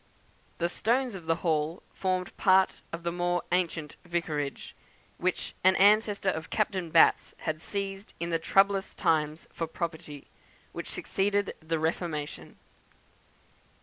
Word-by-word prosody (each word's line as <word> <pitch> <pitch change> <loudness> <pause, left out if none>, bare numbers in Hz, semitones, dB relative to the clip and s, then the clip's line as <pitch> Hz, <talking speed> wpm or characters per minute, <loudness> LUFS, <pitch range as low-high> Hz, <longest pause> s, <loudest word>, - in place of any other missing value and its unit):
The 170 - +1
stones 240 +7 +1
of 175 -4 -9
the 165 - +3
Hall 160 +1 0
formed 185 -1 -1
part 190 0 +4
of 170 0 -6
the 170 - -1
more 175 0 0
ancient 165 -4 -1
vicarage, 155 -5 -3 0.4
which 185 +1 -1
an 185 +1 +6
ancestor 205 0 +4
of 160 -3 -3
Captain 190 -5 -1
Batt's 160 0 +4
had 155 0 -2
seized 195 +1 -4
in 170 +1 -3
the 165 - +1
troublous 195 +3 +2
times 155 -3 +1
for 165 - -3
property 160 -3 -5 0.5
which - - -6
succeeded 200 +1 0
the 160 0 -2
Reformation. 160 -1 -3
175 Hz, 130 wpm, -29 LUFS, 160-195 Hz, 0.5 s, an